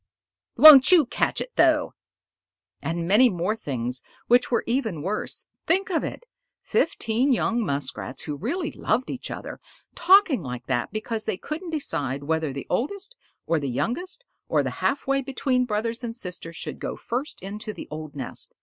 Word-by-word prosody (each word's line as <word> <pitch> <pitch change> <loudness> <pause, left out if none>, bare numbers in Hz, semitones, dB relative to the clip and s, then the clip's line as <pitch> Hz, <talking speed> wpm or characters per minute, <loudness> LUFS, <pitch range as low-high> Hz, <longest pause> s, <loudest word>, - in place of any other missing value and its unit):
"Won't 295 -2 +10
you 340 -6 +7
catch - - 0
it - - -7
though!" - - +3 0.9
And 165 +1 -2
many 225 +7 +6
more 185 +2 -1
things 125 - -4 0.2
which 245 +1 +4
were 235 - +1
even 220 - -1
worse. 205 +4 -2 0.2
Think 375 +3 +1
of 330 - +1
it. - - -6 0.4
Fifteen 255 -4 +1
young 235 -1 +1
Muskrats 140 -4 -3
who 150 - -4
really 290 - -3
loved 245 +4 -1
each 255 - -6
other, - - -7 0.3
talking 355 - +5
like 125 -3 -6
that 120 -2 -1
because 215 +1 -3
they 215 -4 -1
couldn't 325 - -6
decide 145 - -2
whether 160 0 -1
the 135 0 -6
oldest 400 - -2 0.3
or 165 - +1
the 140 -2 -3
youngest 355 - -3 0.2
or - - +2
the - - -2
half 280 - 0
way 275 0 +1
between 260 -1 0
brothers 230 +2 -2
and 230 -1 -4
sisters 180 -6 -6
should - - -6
go - - -4
first 255 +6 -4
into 210 +3 -5
the - - -9
old 155 -1 -7
nest. 130 -3 -7
225 Hz, 170 wpm, -25 LUFS, -, 0.9 s, Won't